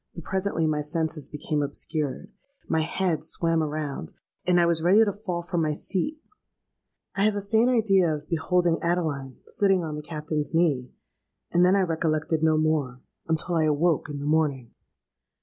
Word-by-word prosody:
But 170 - -8
presently 190 -2 -1
my 155 -1 0
senses 160 0 -2
became 150 0 -2
obscured; 145 +5 -3 0.4
my 160 - +1
head 165 0 -1
swam 165 +1 0
round; 150 - -4 0.3
and 180 -1 +4
I 170 - +4
was 170 -1 +1
ready 195 +7 +5
to 205 - -1
fall 185 -4 -4
from 175 -1 -1
my 155 -1 +1
seat. 195 - -2 1.0
I 200 - 0
have 215 0 +3
a 205 - -2
faint 220 +4 +3
idea 195 -8 +3
of 150 -1 -4
beholding 170 +1 +1
Adeline 155 -7 -1
sitting 195 -5 +1
on 155 -2 -4
the 150 - -5
Captain's 150 0 -3
knee; 145 -7 +2 0.6
and 175 - +4
then 180 +2 +5
I 200 - +3
recollected 160 -2 0
no 160 -1 +3
more, 155 -5 0 0.3
until 160 +2 -1
I 160 -2 +2
awoke 155 +1 +1
in 145 - -5
the 140 - -5
morning! 145 -6 0
160 Hz, 170 wpm, -26 LUFS, 150-180 Hz, 1.0 s, ready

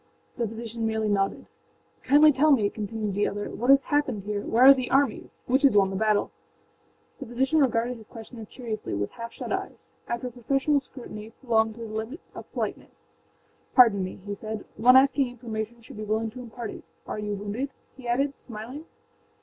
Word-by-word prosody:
â - - -33
The 235 - +1
physician 225 +1 -4
merely 220 -1 0
nodded. 195 -1 0 0.6
âKindly 295 +3 +6
tell 295 +4 +3
me,â 220 -8 +3
continued 215 -1 -3
the 205 +2 +1
other, 205 +1 -4
âwhat 240 - -4
has 275 0 +7
happened 260 -9 0
here. 205 0 -2
Where 230 +4 +2
are 270 +1 +11
the 255 -2 -3
armies? 270 -4 0
Which 265 +2 +2
has 275 -7 +5
won 195 -1 +4
the - - -4
battle?â 215 +1 +2 0.9
The - - -7
physician 265 +6 +1
regarded 245 -2 +1
his 220 -2 -14
questioner 225 0 -10
curiously 220 - -5
with 100 0 -2
half 230 0 -7
shut - - -5
eyes. - - -6 0.2
After 235 +1 -3
a - - -16
professional 270 +4 +1
scrutiny, 235 -5 -9
prolonged 225 -3 +1
to 235 - -10
the 220 -2 -7
limit 220 +9 -4
of - - -10
politeness, - - -5 0.7
âPardon 225 -6 +7
me,â 185 0 -6
he 205 - -4
said; 215 +1 -6
âone 250 +3 +7
asking 275 0 +5
information 235 -1 -6
should 225 - -12
be 215 - -5
willing 220 +1 -1
to 255 - -10
impart 235 -1 -7
it. - - -10 0.2
Are - - -5
you 210 -1 -2
wounded?â 205 +7 -3 0.3
he 260 -2 -10
added, 275 +4 0
smiling. 245 +7 -8
230 Hz, 195 wpm, -26 LUFS, 215-260 Hz, 0.9 s, are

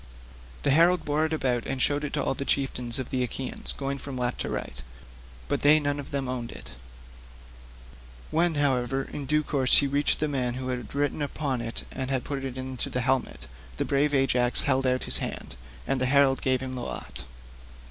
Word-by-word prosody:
The - - +3
herald 170 +4 +4
bore 150 +2 +1
it - - -10
about 125 -6 0
and 135 - -2
showed 145 +2 +1
it 145 - -3
to - - 0
all - - 0
the 140 - -4
chieftains 125 -4 0
of 130 -2 -4
the 130 - 0
Achaeans, 125 +1 -2
going 140 0 -3
from 135 -1 -6
left 125 0 -1
to - - -3
right; - - -4 0.7
but - - -1
they 150 +2 +6
none 145 -1 -1
of 140 - -7
them 140 -2 -2
owned 125 -2 -4
it. - - -9 1.6
When, 165 +1 +3
however, 135 -2 +1
in 140 0 -6
due 150 +2 +2
course 135 -4 +4
he 145 - +4
reached 140 +1 +2
the 155 - +1
man 125 -4 -1
who 130 0 -4
had 125 +1 -5
written 145 +1 0
upon 140 -3 -2
it 115 0 -4
and 130 -1 -3
had 130 -3 0
put 140 -1 -4
it 130 -1 -5
into 130 -1 -4
the 125 - -1
helmet, 130 +1 0 0.3
brave 145 +1 +1
Ajax 125 -2 +3
held 135 -1 +2
out 130 0 +1
his - - +5
hand, - - -5 0.3
and 130 - -1
the 130 - +2
herald 135 0 +4
gave 130 -1 +1
him 130 -1 -5
the 125 - -4
lot. 60 - -5
135 Hz, 205 wpm, -27 LUFS, 125-145 Hz, 1.6 s, they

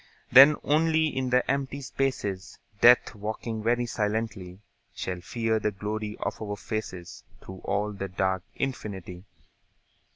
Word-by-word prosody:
Then 135 +4 +9
only 160 0 +2
in 130 -1 -1
the 125 0 +2
empty 140 0 -1
spaces, 115 -9 -3 0.2
Death, 120 +2 +6
walking 110 +1 -5
very 120 +2 +1
silently, 105 -5 -3 0.4
Shall 90 -1 -4
fear 115 +3 -1
the 105 - 0
glory 105 +1 -4
of 100 +2 -3
our 105 -1 -4
faces 95 -5 -6 0.2
Through 95 0 -11
all 105 +1 0
the 100 -1 -4
dark 95 0 -1
infinity. 95 -8 -5
110 Hz, 130 wpm, -27 LUFS, 100-125 Hz, 0.4 s, Then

